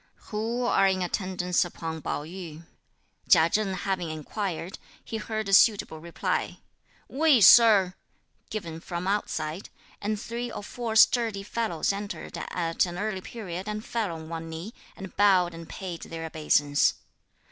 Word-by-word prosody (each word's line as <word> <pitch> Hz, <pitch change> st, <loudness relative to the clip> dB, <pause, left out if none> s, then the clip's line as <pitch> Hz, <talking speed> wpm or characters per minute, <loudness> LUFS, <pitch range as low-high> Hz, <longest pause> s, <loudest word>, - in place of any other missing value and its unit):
"Who 225 Hz, +3 st, -2 dB
are 195 Hz, -5 st, +3 dB
in 190 Hz, -1 st, +1 dB
attendance 180 Hz, -1 st, 0 dB
upon 165 Hz, -2 st, -6 dB
Pao 145 Hz, -, -3 dB
yü?" 165 Hz, -1 st, -9 dB, 0.6 s
Chia 160 Hz, +1 st, +6 dB
Cheng 205 Hz, -3 st, 0 dB
having 185 Hz, -2 st, -2 dB
inquired, 170 Hz, +3 st, -4 dB, 0.3 s
he 225 Hz, -, -4 dB
heard 220 Hz, -1 st, -4 dB
a 195 Hz, -, -1 dB
suitable 200 Hz, -6 st, +4 dB
reply, 170 Hz, +1 st, -2 dB, 0.5 s
"We, 295 Hz, -2 st, +4 dB
Sir!" 205 Hz, -2 st, +7 dB, 0.6 s
given 170 Hz, -7 st, -5 dB
from 175 Hz, +1 st, -5 dB
outside; 175 Hz, -4 st, -2 dB, 0.3 s
and 210 Hz, +1 st, -2 dB
three 235 Hz, +2 st, -5 dB
or -, -, -6 dB
four 230 Hz, 0 st, -4 dB
sturdy 225 Hz, -3 st, +4 dB
fellows 200 Hz, -5 st, -1 dB
entered 200 Hz, 0 st, -6 dB
at 165 Hz, 0 st, -1 dB
an 175 Hz, 0 st, -6 dB
early 200 Hz, -1 st, -2 dB
period 190 Hz, -3 st, -7 dB
and 210 Hz, +1 st, -4 dB
fell 225 Hz, -6 st, -2 dB
on 160 Hz, 0 st, -9 dB
one 165 Hz, 0 st, -6 dB
knee, 165 Hz, +8 st, -7 dB, 0.2 s
and 190 Hz, -3 st, -9 dB
bowed 185 Hz, -4 st, +4 dB
and 165 Hz, 0 st, -10 dB
paid 180 Hz, -3 st, -6 dB
their 165 Hz, 0 st, -6 dB
obeisance. 150 Hz, -2 st, +2 dB
190 Hz, 145 wpm, -27 LUFS, 165-215 Hz, 0.6 s, Sir